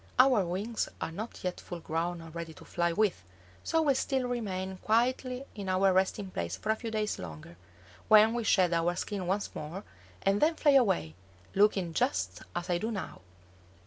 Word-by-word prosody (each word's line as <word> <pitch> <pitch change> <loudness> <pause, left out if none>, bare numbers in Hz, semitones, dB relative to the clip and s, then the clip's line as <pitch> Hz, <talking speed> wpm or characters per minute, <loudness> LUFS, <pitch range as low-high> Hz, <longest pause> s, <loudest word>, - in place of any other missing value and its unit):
Our 255 -5 +6
wings 195 +6 -2
are - - -3
not 215 +8 -7
yet 180 -1 -2
full 175 - -7
grown 165 +1 -2
or 165 - -10
ready 165 -1 -6
to - - -14
fly 170 0 0
with, 205 +1 +1 0.4
so 325 0 +2
we 285 -3 +4
still 265 -1 0
remain 190 -6 -3
quietly 250 +4 +1
in 200 -3 -5
our 190 +1 +3
resting 190 +1 0
place 85 - -3
for 215 - -1
a - - +2
few 230 +1 -5
days 215 -1 -1
longer, 85 -1 -9 0.5
when 215 +1 +7
we 240 -1 -1
shed 185 -4 +3
our 170 +1 +1
skin 190 0 -3
once 200 +2 -1
more, 165 +7 -6 0.4
and 195 +1 +2
then 320 +2 +4
fly 295 - +4
away, 195 - +3 0.4
looking 195 -4 +3
just 90 - 0
as 175 0 -3
I 175 -2 +1
do 220 - -2
now. 200 - -5
195 Hz, 185 wpm, -30 LUFS, 175-225 Hz, 0.5 s, when